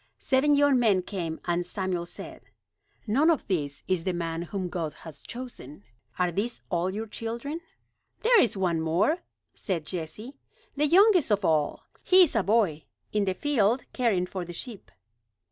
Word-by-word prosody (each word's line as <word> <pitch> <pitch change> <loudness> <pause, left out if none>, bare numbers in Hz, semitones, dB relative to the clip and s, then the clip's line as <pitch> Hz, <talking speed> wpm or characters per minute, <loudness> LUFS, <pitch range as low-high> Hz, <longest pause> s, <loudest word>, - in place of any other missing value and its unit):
Seven 275 +2 +3
young 285 -2 +4
men 205 -6 +3
came 170 -5 -4
and 175 0 0
Samuel 180 -1 -3
said: - - -9 0.6
"None 270 +9 +3
of 320 -5 +1
these 145 -7 -2
is 185 -3 0
the 185 -1 -1
man 165 -1 -3
whom 185 +2 -4
God 165 -3 -4
has 160 -3 -10
chosen. 235 - -9 0.3
Are 180 -1 +1
these 215 +7 -2
all 175 +1 +1
your 215 +3 -4
children?" 235 +9 -5 0.6
"There 470 -1 +6
is 225 - +1
one 175 -4 +1
more," 175 - +2 0.3
said 170 -6 -3
Jesse. 185 - -6 0.4
"The 295 +2 +2
youngest 375 - +5
of 205 -2 +1
all. 155 -2 +1 0.2
He 370 0 +7
is 320 - 0
a 225 - +4
boy, 195 -7 +1 0.3
in 210 -1 +2
the 190 -1 -1
field 245 -3 +1
caring 215 -8 +1
for 185 0 -5
the 175 0 -8
sheep." 210 - -8
195 Hz, 165 wpm, -27 LUFS, 175-250 Hz, 0.6 s, He